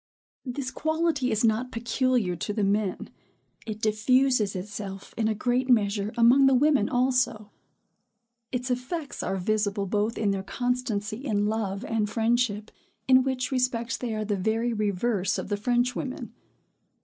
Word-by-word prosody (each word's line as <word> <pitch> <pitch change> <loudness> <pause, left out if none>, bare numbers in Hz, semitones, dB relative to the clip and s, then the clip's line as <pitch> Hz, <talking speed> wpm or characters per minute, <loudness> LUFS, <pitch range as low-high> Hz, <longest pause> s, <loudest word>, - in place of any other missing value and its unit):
This 260 +1 -4
quality 315 -2 0
is 220 0 +1
not 230 +3 +1
peculiar 235 -4 0
to 190 +5 -4
the 210 -1 -1
men; 200 -1 -1 0.6
it 215 -1 -4
diffuses 220 0 +2
itself, 195 0 -7
in 225 -1 0
a 220 - 0
great 250 +4 0
measure, 205 -3 +2
among 250 +4 +6
the 270 - +5
women 275 -5 +3
also. 245 -4 +1 1.0
Its 250 0 -2
effects 275 +5 -4
are 195 - -2
visible 205 +1 0
both 210 +3 -1
in 210 -2 +1
their 195 -1 -1
constancy 220 -1 -2
in 205 -6 0
love 210 0 -2
and 220 -2 -1
friendship, 225 -1 0 0.4
in 260 0 +6
which 260 0 -2
respects 250 -1 0
they 235 -3 -3
are 215 0 -2
the 210 -1 0
very 225 +5 0
reverse 205 -1 0
of - - -5
the 205 - +1
French 245 +3 +1
women. 260 -1 -5
225 Hz, 150 wpm, -26 LUFS, 205-255 Hz, 1.0 s, among